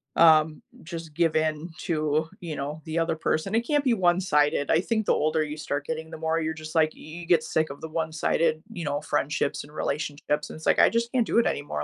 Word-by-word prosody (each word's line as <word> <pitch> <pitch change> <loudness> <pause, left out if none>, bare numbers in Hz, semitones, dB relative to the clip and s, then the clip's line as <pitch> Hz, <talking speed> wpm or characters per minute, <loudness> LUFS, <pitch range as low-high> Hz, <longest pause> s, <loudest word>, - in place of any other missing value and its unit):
um, 155 -2 +5 0.2
just 165 -2 -8
give 165 -1 +2
in 155 +1 0
to, 155 -1 0
you 165 -3 -5
know, 145 +3 -5
the 160 +1 -1
other 165 0 0
person. 160 +5 -1
It 230 +1 +1
can't 295 +2 +1
be 250 -4 +3
one-sided. 175 -7 +2
I - - +4
think 220 +3 -1
the - - +4
older 155 +1 +1
you 150 0 -5
start 145 -1 -3
getting, 160 0 -4
the 160 - -7
more 160 +1 0
you're 160 0 -1
just, 155 +1 -9
like, 160 -1 +4
y - - -18
you 165 +3 -9
get 165 -2 +3
sick 160 0 0
of 140 - -10
the 160 - -6
one-sided, 160 0 0
you 170 -6 -5
know, 145 0 -1
friendships 145 -1 -1
and 150 +1 -15
relationships. 150 0 -2
And - - -8
it's 160 - -7
like, - - +4
"I - - +7
just 235 +1 -1
can't 250 -3 +2
do 230 - +2
it 235 - +3
anymore." 75 - -2
160 Hz, 240 wpm, -26 LUFS, 150-170 Hz, 0.2 s, I